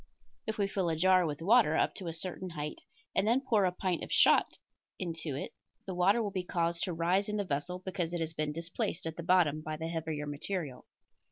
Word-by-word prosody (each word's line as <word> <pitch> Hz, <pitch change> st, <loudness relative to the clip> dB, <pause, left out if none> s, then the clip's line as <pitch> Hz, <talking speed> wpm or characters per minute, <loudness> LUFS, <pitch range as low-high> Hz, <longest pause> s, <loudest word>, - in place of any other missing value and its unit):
If 220 Hz, -, -2 dB
we 200 Hz, -2 st, +1 dB
fill 190 Hz, -3 st, -1 dB
a 160 Hz, -, 0 dB
jar 185 Hz, +1 st, +4 dB
with 150 Hz, +1 st, -4 dB
water 205 Hz, -5 st, +5 dB
up -, -, +2 dB
to 185 Hz, -, -5 dB
a -, -, -1 dB
certain 185 Hz, +2 st, -4 dB
height 150 Hz, -2 st, -5 dB, 0.3 s
and 195 Hz, -, +2 dB
then 235 Hz, +4 st, +4 dB
pour 210 Hz, -5 st, +4 dB
a 180 Hz, -, +2 dB
pint 180 Hz, -1 st, -2 dB
of -, -, -7 dB
shot -, -, +5 dB, 0.4 s
into 165 Hz, -5 st, -3 dB
it 140 Hz, -, -5 dB, 0.3 s
the 190 Hz, -, -4 dB
water 195 Hz, +6 st, +3 dB
will 205 Hz, -, -2 dB
be 190 Hz, -1 st, -1 dB
caused 170 Hz, -1 st, -1 dB
to 180 Hz, -, -3 dB
rise 180 Hz, +5 st, +1 dB
in 210 Hz, -, -1 dB
the 205 Hz, -, 0 dB
vessel 180 Hz, +1 st, -2 dB
because 180 Hz, -3 st, -2 dB
it 175 Hz, -, -2 dB
has 165 Hz, 0 st, -1 dB
been 155 Hz, -1 st, -1 dB
displaced 165 Hz, +2 st, -2 dB
at 160 Hz, -1 st, -3 dB
the 170 Hz, -, -5 dB
bottom 165 Hz, -3 st, +3 dB
by 155 Hz, 0 st, -4 dB
the 160 Hz, +1 st, -4 dB
heavier 160 Hz, -3 st, -3 dB
material. 145 Hz, -2 st, -4 dB
170 Hz, 230 wpm, -32 LUFS, 160-190 Hz, 0.4 s, water